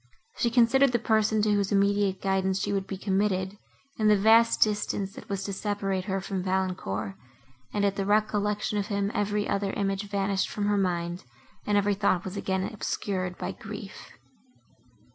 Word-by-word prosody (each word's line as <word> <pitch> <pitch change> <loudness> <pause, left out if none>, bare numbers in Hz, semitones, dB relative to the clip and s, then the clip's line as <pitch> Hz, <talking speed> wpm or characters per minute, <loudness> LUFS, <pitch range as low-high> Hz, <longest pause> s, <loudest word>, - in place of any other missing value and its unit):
She 235 - +2
considered 245 +3 +4
the - - +4
person, 220 -2 +2
to 210 - +2
whose 200 -1 0
immediate 200 -1 +2
guidance 190 0 +1
she 205 - -1
would 195 -1 -1
be 195 - -5
committed, 190 0 0 0.4
and 215 -1 +4
the 210 - +6
vast 225 +3 +5
distance, 205 -2 -2
that 215 - -12
was 195 -1 -2
to 200 - -4
separate 195 -2 -2
her 195 0 -1
from 190 0 -3
Valancourt, 180 - -2 0.6
and, 205 -1 0
at 200 0 0
the 195 - -1
recollection 210 0 +1
of 200 - -2
him, 200 -1 -1
every 205 0 0
other 200 0 -1
image 195 0 -2
vanished 195 -1 0
from 205 - -2
her 205 0 +2
mind, 175 -1 -1 0.4
and 205 -1 +3
every 205 0 +2
thought 190 -2 +1
was 190 +1 -5
again 190 -1 -1
obscured 185 -3 -3
by - - -3
grief. - - -9
200 Hz, 175 wpm, -27 LUFS, 190-210 Hz, 0.6 s, the